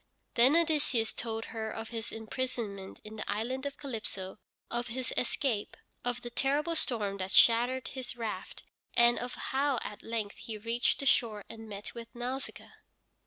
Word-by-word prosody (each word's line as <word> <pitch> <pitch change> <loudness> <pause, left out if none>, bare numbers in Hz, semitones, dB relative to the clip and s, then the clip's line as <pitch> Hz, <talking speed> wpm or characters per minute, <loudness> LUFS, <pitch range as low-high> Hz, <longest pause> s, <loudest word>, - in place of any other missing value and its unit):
Then 255 +6 +7
Odysseus 300 -9 +3
told 225 -1 -3
her 220 -1 -2
of 225 +1 -5
his 225 -1 -3
imprisonment 220 -4 -3
in 215 +1 -8
the 215 - -2
island 255 +6 -1
of 280 - -6
Calypso, 215 -8 -4 0.3
of 240 0 -1
his 250 +1 -3
escape, 240 -4 0 0.3
of 245 -1 -1
the 240 - -5
terrible 290 +7 +2
storm 210 -9 0
that 185 -1 -2
shattered 240 +5 +6
his 260 -2 -6
raft, 225 -2 -4 0.3
and 240 0 +6
of 245 +1 -4
how 275 0 +1
at 210 - -6
length 220 -3 -3
he 225 -2 -5
reached 230 +3 +1
the - - -3
shore 220 -5 +3
and 225 -1 -9
met 205 0 -6
with 235 -1 -7
Nausicaa. 250 +3 -4
235 Hz, 165 wpm, -32 LUFS, 220-260 Hz, 0.3 s, Then